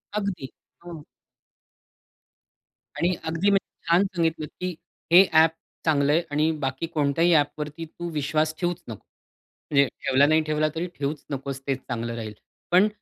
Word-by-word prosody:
अगदी. 200 -10 -3 0.3
हो. 165 -3 -8 1.9
आणि 175 +2 +2
अगदी 165 +5 +1
म्हणजे 195 -3 -1
छान 170 +3 +5
सांगितलंत, 165 -2 0
की 180 -1 -2 0.4
हे 180 +3 +9
अ‍ॅप 160 0 +6 0.3
चांगलंय 150 +1 +3
आणि 155 +2 +2
बाकी 135 +5 -2
कोणत्याही 160 +3 +2
अ‍ॅपवरती 150 +1 0
तू 175 +2 -7
विश्वास 155 +1 0
ठेवूच 175 -1 -2
नकोस. 110 -3 -9 0.7
म्हणजे 140 -1 +5 0.2
ठेवला, 130 +2 +4
नाही 155 +1 +4
ठेवला 155 0 +1
तरी 170 +3 -2
ठेवूच 145 +1 -3
नकोस, 135 -1 -4
तेच 135 -1 0
चांगलं 115 -1 -3
राहील. 110 -2 -6 0.4
पण 185 +4 +6
155 Hz, 140 wpm, -25 LUFS, 140-170 Hz, 1.9 s, हे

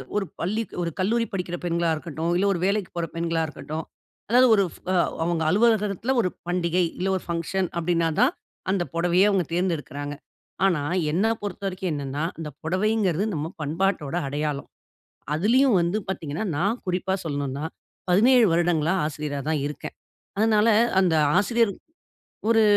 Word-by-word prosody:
ஒரு 205 -1 +1 0.2
பள்ளி 215 +6 0 0.2
ஒரு 170 -1 -1
கல்லூரி 230 +5 +2
படிக்கிற 180 -2 -3
பெண்களா 170 -1 +1
இருக்கட்டும், 160 +1 -3
இல்ல 195 - +2
ஒரு 175 - -3
வேலைக்குப் 200 -2 -1
போற 170 -1 -1
பெண்களா 165 -1 0
இருக்கட்டும், 155 +1 -6 0.5
அதாவது 250 +3 +6
ஒரு 200 - +3
ஃப - - -14 0.5
அவங்க 170 -1 0
அலுவலகத்துல 215 +3 +2
ஒரு 185 - 0 0.2
பண்டிகை, 175 0 +1 0.2
இல்ல 185 - 0
ஒரு - - -9
ஃபங்ஷன் 170 +2 -1
அப்படீன்னா 170 -1 +1
தான், 270 +8 +4 0.4
அந்த 190 -2 +1
பொடவைய 175 +4 +4
அவங்க 190 -3 +1
தேர்ந்தெடுக்கறாங்க. 150 -5 -2 0.5
ஆனா, 175 -6 +2 0.3
என்ன 180 +7 +1 0.2
பொறுத்த 205 -2 -5
வரைக்கும் 185 -2 -3
என்னன்னா, 140 0 -3
அந்த 160 -2 -5
பொடவைங்கறது 190 +1 +1
நம்ம 150 +1 -2
பண்பாட்டோட 160 0 -1
அடையாளம். 145 0 -3 0.7
அதுலயும் 235 - +4
வந்து 170 +4 0
பாத்தீங்கன்னா, 165 +1 -3
நான் 200 +9 0
குறிப்பா 185 +1 0
சொல்லணும்ன்னா, 145 -1 -3 0.4
17 235 +6 +6
வருடங்களா 170 -1 +2
ஆசிரியரா 150 -2 -3
தான் 155 -2 +1
இருக்கேன். 150 - -7 0.4
அதனால, 215 +1 +4 0.3
அந்த 180 -4 +3 0.2
ஆசிரியர் 225 +3 +2 0.8
"ஒரு 225 -1 +5
175 Hz, 140 wpm, -25 LUFS, 160-200 Hz, 0.8 s, அதாவது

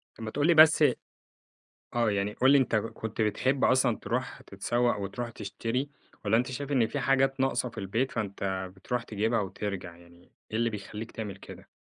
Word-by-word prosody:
طب 115 - -9
ما 110 - -4
تقول 145 +2 +1
لي 170 - +6
بس 155 0 +7 1.1
آه، 120 -2 +2
يعني 100 +1 -1
قُل 130 +4 +4
لي 140 - +7
أنت 130 -4 +2
كنت 110 +1 -3
بتحب 130 +5 +1
أصلًا 130 -3 +3
تروح 125 +2 -3
تتسوّق 120 +4 0
وتروح 115 +5 -4
تشتري، 115 +6 -3 0.4
والّا 110 +2 +4
أنت 125 +2 0
شايف 140 +2 -5
إن 120 -5 +3
في 145 - -3
حاجات 135 0 +2
ناقصة 135 -1 +1
في 115 - -17
البيت، 110 +6 -1
فأنت 95 -3 -3
بتروح 120 +5 -3
تجيبها 110 +1 0
وترجع 95 -3 -5
يعني، 85 0 -19 0.2
إيه 110 - -1
اللي 115 0 +2
بيخلّيك 105 +1 -7
تعمل 105 -4 -6
كده؟ - - -12
115 Hz, 185 wpm, -29 LUFS, 100-130 Hz, 1.1 s, بس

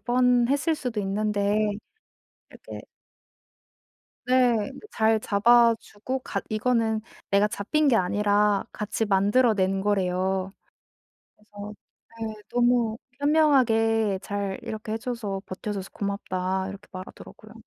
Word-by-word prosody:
뻔 245 +2 +3
했을 285 +4 +1
수도 245 -7 -3
있는데 205 +1 0 0.9
이렇게 - - -10 1.4
네. 250 -3 +3
그 430 - -14
잘 220 0 +2
잡아주고 230 +3 +2
같 - - -4
이거는 220 0 +1 0.3
내가 200 +1 +4
잡힌 290 +10 0
게 255 - +4
아니라 205 +1 +2
같이 215 +1 -2
만들어 210 +4 +3
낸 190 -1 0
거래요. 190 -1 0 0.8
그래서 210 0 -10 0.5
네. 220 - -5 0.2
"너무 240 -2 +2 0.2
현명하게 225 -9 +3
잘 200 -1 -3
이렇게 215 0 -6
해 225 - -1
줘서 220 -5 -4
버텨 200 +3 -5
줘서 195 -1 -5
고맙다." 190 -1 -2
이렇게 200 +1 -10
말하더라고요. 190 +3 -11
215 Hz, 245 characters per minute, -25 LUFS, 200-240 Hz, 1.4 s, 내가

